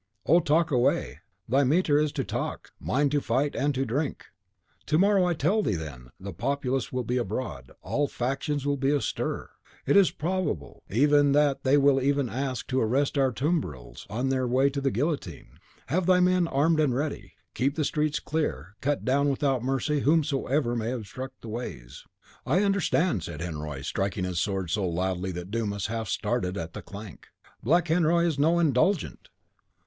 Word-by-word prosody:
"Oh, 170 Hz, -, +5 dB
talk 160 Hz, +1 st, +2 dB
away! 80 Hz, -, +1 dB, 0.3 s
thy 135 Hz, +5 st, +3 dB
metier 150 Hz, +1 st, +3 dB
is 150 Hz, -1 st, +1 dB
to 140 Hz, -3 st, -1 dB
talk, -, -, -4 dB
mine 140 Hz, +1 st, +1 dB
to 145 Hz, -1 st, +1 dB
fight 135 Hz, +5 st, 0 dB
and 145 Hz, +2 st, +1 dB
to 135 Hz, +1 st, 0 dB
drink." 140 Hz, +5 st, -2 dB, 0.6 s
"To 155 Hz, -, +2 dB
morrow, 195 Hz, 0 st, +4 dB
I 175 Hz, -1 st, +1 dB
tell 185 Hz, +9 st, +2 dB
thee 105 Hz, -, 0 dB
then, 70 Hz, -7 st, -7 dB
the 100 Hz, 0 st, -7 dB
populace 135 Hz, -, -1 dB
will 125 Hz, -1 st, -2 dB
be 125 Hz, +2 st, -1 dB
abroad; 100 Hz, -, -4 dB
all 145 Hz, 0 st, 0 dB
factions 140 Hz, +3 st, -2 dB
will 145 Hz, 0 st, +1 dB
be 135 Hz, +1 st, +1 dB
astir. 145 Hz, -1 st, -2 dB, 0.3 s
It -, -, +2 dB
is 200 Hz, -2 st, +6 dB
probable 170 Hz, -, -3 dB
enough 145 Hz, +4 st, +4 dB
that 145 Hz, -1 st, +2 dB
they 135 Hz, +2 st, +4 dB
will 140 Hz, -1 st, +4 dB
even 140 Hz, -2 st, +1 dB, 0.2 s
seek -, -, -6 dB
to 130 Hz, -1 st, +1 dB
arrest 135 Hz, +7 st, +1 dB
our 135 Hz, -2 st, +3 dB
tumbrils 90 Hz, -, -3 dB
on 125 Hz, +6 st, -1 dB
their 130 Hz, -1 st, 0 dB
way 130 Hz, +3 st, +3 dB
to 140 Hz, 0 st, -3 dB
the 135 Hz, -, +2 dB
guillotine. 140 Hz, +7 st, -3 dB, 0.3 s
Have 185 Hz, +1 st, 0 dB
thy 185 Hz, -1 st, +5 dB
men 180 Hz, -1 st, +3 dB
armed 155 Hz, +3 st, +2 dB
and 145 Hz, -5 st, +2 dB
ready; 145 Hz, +3 st, -3 dB, 0.2 s
keep 135 Hz, +4 st, 0 dB
the 155 Hz, -, 0 dB
streets 150 Hz, +1 st, 0 dB
clear; 95 Hz, -, -3 dB
cut 145 Hz, +1 st, -1 dB
down 140 Hz, +2 st, +2 dB
without 135 Hz, -2 st, 0 dB
mercy 135 Hz, +3 st, 0 dB
whomsoever 140 Hz, -4 st, +1 dB
may 115 Hz, 0 st, -2 dB
obstruct 130 Hz, +3 st, -7 dB
the 115 Hz, -, -8 dB
ways." 80 Hz, -, -7 dB, 0.4 s
"I 180 Hz, +9 st, +2 dB
understand," 185 Hz, -, +1 dB
said 80 Hz, -2 st, -7 dB
Henriot, 75 Hz, -5 st, -5 dB
striking 95 Hz, -1 st, -2 dB
his 90 Hz, -2 st, -2 dB
sword 95 Hz, -4 st, -2 dB
so 100 Hz, +3 st, 0 dB
loudly 90 Hz, +2 st, -2 dB
that 90 Hz, +2 st, -7 dB
Dumas 100 Hz, -4 st, -2 dB
half 110 Hz, 0 st, -3 dB
started 90 Hz, +1 st, -1 dB
at 80 Hz, -3 st, -5 dB
the -, -, -7 dB
clank, 100 Hz, -3 st, -10 dB, 0.3 s
"Black 170 Hz, +8 st, +2 dB
Henriot 170 Hz, +1 st, +3 dB
is 160 Hz, -5 st, -1 dB
no 165 Hz, +4 st, +3 dB
'Indulgent. 165 Hz, +3 st, +1 dB
135 Hz, 180 wpm, -27 LUFS, 110-150 Hz, 0.6 s, is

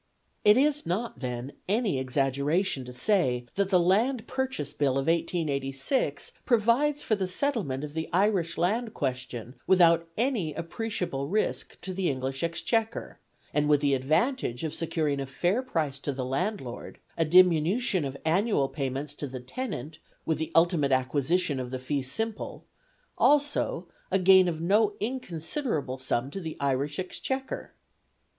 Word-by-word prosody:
It 210 Hz, +2 st, +7 dB
is 295 Hz, +2 st, +3 dB
not, 205 Hz, +8 st, -2 dB
then, 125 Hz, +1 st, -4 dB, 0.2 s
any 205 Hz, -, +1 dB
exaggeration 140 Hz, +5 st, 0 dB
to 125 Hz, -, -8 dB
say 125 Hz, -, +1 dB
that 200 Hz, -1 st, 0 dB
the 185 Hz, -2 st, +5 dB
Land 220 Hz, +8 st, +2 dB
Purchase 265 Hz, -, -3 dB
Bill 140 Hz, -3 st, +1 dB
of 135 Hz, +1 st, 0 dB
1886 155 Hz, -, -1 dB
provides 255 Hz, +5 st, +2 dB
for -, -, 0 dB
the 195 Hz, -3 st, 0 dB
settlement 180 Hz, -, -1 dB
of 150 Hz, -1 st, -6 dB
the 160 Hz, 0 st, -3 dB
Irish 180 Hz, -3 st, +1 dB
Land 220 Hz, +6 st, 0 dB
question 130 Hz, -3 st, -3 dB
without 170 Hz, -2 st, +5 dB
any 220 Hz, -, 0 dB
appreciable 170 Hz, -5 st, -3 dB
risk 210 Hz, +7 st, -1 dB
to 190 Hz, -, -5 dB
the 185 Hz, -1 st, 0 dB
English 135 Hz, 0 st, -3 dB
Exchequer, 220 Hz, +7 st, -1 dB, 0.3 s
and 150 Hz, 0 st, +2 dB
with 145 Hz, -1 st, +5 dB
the 140 Hz, -1 st, +2 dB
advantage 155 Hz, -, 0 dB
of 160 Hz, -, -2 dB
securing 155 Hz, -4 st, -1 dB
a 135 Hz, -, -3 dB
fair 175 Hz, -, 0 dB
price 155 Hz, -, -2 dB
for 140 Hz, -, -3 dB
the 130 Hz, -1 st, -3 dB
landlord, 135 Hz, -, -3 dB, 0.2 s
a 165 Hz, -, +2 dB
diminution 180 Hz, -, +4 dB
of 140 Hz, 0 st, -4 dB
annual 170 Hz, -4 st, +2 dB
payments 135 Hz, +1 st, -3 dB
to 145 Hz, -, -5 dB
the 130 Hz, -1 st, -6 dB
tenant 160 Hz, -, -5 dB, 0.3 s
with 160 Hz, -, 0 dB
the 160 Hz, -, -3 dB
ultimate 165 Hz, -4 st, +4 dB
acquisition 140 Hz, +4 st, +1 dB
of 125 Hz, -1 st, -4 dB
the 130 Hz, -, -3 dB
fee 135 Hz, +2 st, -2 dB
simple, 215 Hz, +12 st, -4 dB, 0.5 s
also 290 Hz, -, +2 dB, 0.2 s
a 190 Hz, -, +3 dB
gain 190 Hz, 0 st, +6 dB
of 165 Hz, -2 st, -2 dB
no 205 Hz, +4 st, +3 dB
inconsiderable 190 Hz, -, -3 dB
sum 130 Hz, +1 st, -1 dB
to 195 Hz, -, -4 dB
the 160 Hz, -4 st, -6 dB
Irish 140 Hz, +1 st, 0 dB
Exchequer. 265 Hz, +8 st, -4 dB
165 Hz, 150 wpm, -28 LUFS, 135-210 Hz, 0.5 s, It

